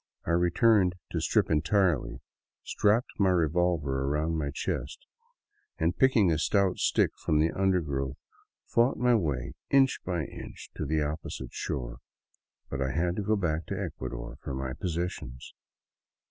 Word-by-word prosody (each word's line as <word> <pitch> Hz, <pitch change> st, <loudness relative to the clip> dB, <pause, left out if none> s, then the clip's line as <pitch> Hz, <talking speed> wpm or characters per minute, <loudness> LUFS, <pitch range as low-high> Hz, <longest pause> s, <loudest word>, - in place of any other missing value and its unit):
I -, -, -1 dB
returned 90 Hz, +2 st, +3 dB, 0.2 s
to -, -, -1 dB
strip -, -, +2 dB
en 75 Hz, -1 st, +3 dB
tirely, 80 Hz, -, +1 dB, 0.4 s
strapped 110 Hz, +4 st, +1 dB
my 100 Hz, -2 st, +4 dB
revolver 80 Hz, -5 st, +1 dB
about 80 Hz, +2 st, 0 dB
my 80 Hz, -3 st, -1 dB
chest 285 Hz, -, -4 dB, 0.7 s
and, -, -, +1 dB
picking 120 Hz, -, +4 dB
a 80 Hz, -, +1 dB
stout 100 Hz, +2 st, +2 dB
stick -, -, +2 dB
from 75 Hz, -, +2 dB
the 80 Hz, +2 st, +3 dB
undergrowth, 75 Hz, -9 st, 0 dB, 0.5 s
fought 120 Hz, +3 st, +2 dB
my 125 Hz, 0 st, +3 dB
way 75 Hz, -, 0 dB, 0.2 s
inch 135 Hz, -1 st, +4 dB
by 85 Hz, -4 st, -1 dB
inch -, -, -10 dB
to 75 Hz, -, -3 dB
the 80 Hz, +1 st, +1 dB
opposite 75 Hz, +2 st, -5 dB
shore. -, -, -4 dB, 0.7 s
But 70 Hz, -, -4 dB
I 65 Hz, -, 0 dB
had 85 Hz, +3 st, 0 dB
to -, -, 0 dB
go 105 Hz, +2 st, +1 dB
back 80 Hz, -5 st, -1 dB
to -, -, -3 dB
Ecuador -, -, -5 dB
for 65 Hz, -, -5 dB
my 65 Hz, -1 st, -3 dB
possessions. 85 Hz, -6 st, -4 dB
85 Hz, 150 wpm, -29 LUFS, 70-95 Hz, 0.7 s, my